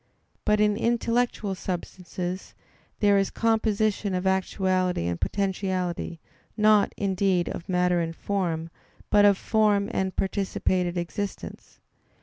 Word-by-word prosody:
But 210 -1 +3
in 210 -1 +3
intellectual 235 -3 0
substances 180 0 -5 0.5
there 205 -1 +5
is 195 - 0
composition 215 -3 +1
of 180 +1 -2
actuality 185 - +1
and 85 -1 -3
potentiality, 185 -4 -2 0.4
not, 215 -1 +4
indeed, 190 -2 +1
of 170 - -7
matter 180 -1 +2
and 165 -1 -2
form, 165 -5 -2 0.4
but 205 0 +6
of 200 -1 +5
form 210 -1 +2
and 190 -1 -1
participated 185 -2 -1
existence. 195 +4 -5
190 Hz, 115 wpm, -26 LUFS, 180-205 Hz, 0.5 s, but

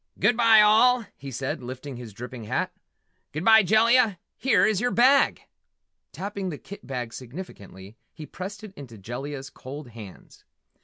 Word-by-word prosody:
"Goodbye, 230 -2 +5
all!" 230 +3 +5
he 140 - -9
said, 130 +1 -4
lifting 130 +2 -8
his 120 -2 -9
dripping 120 +2 -9
hat. - - -2 0.6
"Goodbye, 220 +9 +5
Jellia 220 +1 +3 0.2
here 260 -2 +3
is 215 -2 +1
your 245 - +1
bag!" 260 +4 +4 0.7
Tapping 195 0 -5
the 150 - -6
kit 200 - -12
bag 125 -4 -5
significantly, 115 - -10
he 155 - -10
pressed 200 +6 -8
it 210 -3 -10
into 130 - -11
Jellia's 135 +7 -7
cold 135 +1 -9
hands. 110 -5 -13
150 Hz, 145 wpm, -25 LUFS, -, 0.7 s, Goodbye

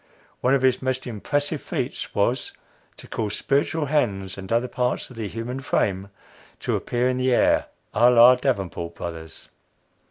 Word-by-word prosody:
One 130 +2 +3
of 135 - 0
his 130 -1 +3
most 130 0 -2
impressive 145 +6 -2
feats - - -4
was, - - 0 0.4
to - - -12
cause 105 -2 -3
spiritual 145 +3 0
hands 100 -10 0
and 95 -1 -9
other 120 +2 +2
parts 125 +1 -2
of - - -11
the 110 -2 -4
human 115 +5 -5
frame 100 -7 -1 0.5
to - - 0
appear 120 +1 0
in 130 0 0
the 130 0 +1
air 120 - +3 0.3
à 120 +3 +5
la 120 +1 +8
Davenport 95 -10 -2
Brothers. 80 -2 -8
125 Hz, 160 wpm, -24 LUFS, 100-130 Hz, 0.5 s, la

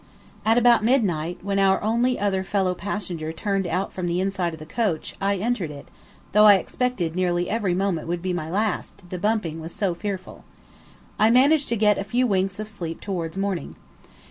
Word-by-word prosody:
About 235 0 +5
midnight, 180 - +1
when 195 0 0
our 195 -1 +4
only 235 +4 +1
other 195 -2 0
fellow 190 -1 0
passenger 175 -4 -4
turned 195 +2 -1
out 180 +4 -2
from 185 -2 -3
the 175 +1 0
inside 190 -2 0
of 160 - -8
the 155 - -10
coach, 190 -2 -2
I 200 +1 +2
entered 200 -4 -1
it, 145 -1 -10 0.4
though 210 +1 +6
I 205 -1 +9
expected 190 -4 -1
nearly 175 -1 0
every 205 -5 0
moment 185 -4 -1
would 170 0 -3
be 185 -1 -1
my 160 -3 -3
last, 200 -1 -2
the 180 - -4
bumping 180 -6 -1
was 165 +2 -8
so 195 -4 0
fearful. 190 0 -6 0.8
I 215 - +5
managed 275 +5 +4
to 235 - +1
get 210 -1 +3
a - - -1
few 240 +6 +1
winks 195 -2 0
of 215 - -4
sleep 175 -6 -6
towards 175 -3 -4
morning. 195 -3 -2
195 Hz, 190 wpm, -24 LUFS, 175-215 Hz, 0.8 s, I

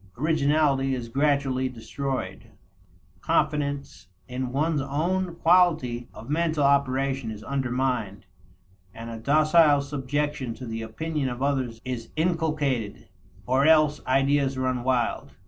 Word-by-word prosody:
Originality 145 -2 +2
is 120 -2 -6
gradually 135 -1 +1
destroyed, 130 +3 -5 0.7
confidence 145 -5 -1 0.2
in 125 0 -4
one's 150 +2 0
own 170 +6 -1
quality 160 -10 +2
of 110 - -12
mental 155 0 0
operation 135 -2 +1
is 110 -1 -7
undermined, 125 -6 -2 0.7
and 115 +1 -7
a 115 - -7
docile 155 +3 +4
subjection 140 -2 -3
to 130 - -9
the 115 -1 -5
opinion 145 +5 -3
of 125 +2 -4
others 130 -5 -1
is 120 -3 -5
inculcated, 155 - -1 0.4
or 130 +6 +2
else 155 -2 +4
ideas 135 0 +2
run 130 -1 -1
wild. 125 -2 -1
135 Hz, 115 wpm, -25 LUFS, 125-150 Hz, 0.7 s, docile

